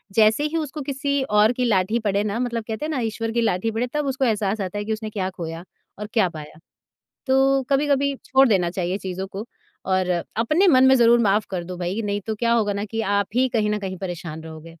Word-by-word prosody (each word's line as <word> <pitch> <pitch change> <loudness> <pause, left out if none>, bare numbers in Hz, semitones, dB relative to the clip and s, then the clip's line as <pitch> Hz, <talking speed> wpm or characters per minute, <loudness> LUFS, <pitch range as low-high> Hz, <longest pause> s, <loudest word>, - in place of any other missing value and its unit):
जैसे 220 +5 +4
ही 310 +2 -1
उसको 300 -1 -4
किसी 280 0 -1 0.2
और 215 +3 +5
की 250 0 -1
लाठी 215 +1 +1
पड़े 205 -1 0
ना 210 +2 -2
मतलब 235 -2 -2
कहते 225 +7 -3
हैं - - -3
ना 270 - -1
ईश्वर 225 +1 -3
की 235 0 0
लाठी 220 0 0
पड़े 235 +3 -1
तब 295 -1 -1
उसको 265 0 0
एहसास 210 -2 0
आता 190 +2 -4
है 205 - -3
कि 220 - -1
उसने 215 0 -5
क्या 190 -3 -2
ख़ोया 165 -2 -7 0.4
और 210 - -5
क्या 205 -6 +3
पाया। 155 -1 -10 0.7
तो 270 +1 +3
कभी-कभी 280 0 +2
छोड़ 270 +1 +4
देना 180 -5 +2
चाहिए 185 +1 -2
चीज़ों 190 0 -5
को 200 +4 -7 0.4
और 185 -1 +2 0.3
अपने 305 - +2
मन 260 -4 +6
में 265 - +6
ज़रूर 235 0 +5
माफ़ 210 0 +2
कर 180 -3 -3
दो 180 0 -7
भई 180 +4 -3
नहीं 205 0 -2
तो 220 - -1
क्या 235 +1 +1
होगा 215 -3 +2
ना 200 +1 -3
कि 225 +1 -4 0.2
आप 200 -1 +1
ही 260 +1 +3
कहीं 215 -4 0
न 210 - 0
कहीं 190 -2 -5
परेशान 170 -4 -6
रहोगे। 160 0 -10
215 Hz, 235 wpm, -23 LUFS, 190-250 Hz, 0.7 s, मन